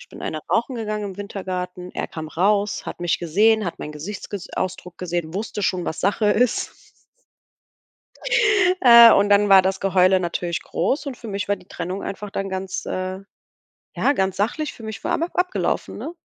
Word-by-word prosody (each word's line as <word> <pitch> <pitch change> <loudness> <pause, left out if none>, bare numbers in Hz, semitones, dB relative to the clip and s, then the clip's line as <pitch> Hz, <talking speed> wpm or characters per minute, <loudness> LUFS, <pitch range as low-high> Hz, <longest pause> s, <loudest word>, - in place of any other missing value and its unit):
Ich - - -15
bin - - -13
eine 155 - -4
rauchen 235 +3 +1
gegangen 215 -2 -3
im 195 -2 -6
Wintergarten. 185 -3 -5
Er - - -4
kam 160 -1 -7
raus, 200 +5 0
hat - - -6
mich 175 -2 -1
gesehen, 210 +6 +3
hat 170 - -5
meinen 150 - -6
Gesichtsges 190 +4 -7
Ausdruck 180 -1 -4
gesehen, 175 -3 -3
wusste 205 +1 -4
schon, 180 -2 0
was - - -4
Sache 205 +2 +1
ist. 245 +3 +1 2.1
Äh, 235 -2 +10
und 205 +1 +3
dann 205 0 +4
war 190 -1 +8
das 190 +1 -1
Geheule 190 -1 +3
natürlich 175 -1 -2
groß 265 - -1
und 270 -3 -5
für 235 - -10
mich 200 -1 -3
war 205 - +1
die 180 -1 -19
Trennung 180 +3 -5
einfach 205 +1 -6
dann 195 0 -3
ganz, 190 0 -4
äh, 185 0 -3 0.8
ja, 280 - +2
ganz 190 -6 -1
sachlich 255 +9 -1
für 230 - -14
mich 220 0 -7
war - - -1
einfach 335 +2 -1
abgelaufen, 360 +1 -1
ne? 330 - -6
195 Hz, 185 wpm, -22 LUFS, 180-215 Hz, 2.1 s, Äh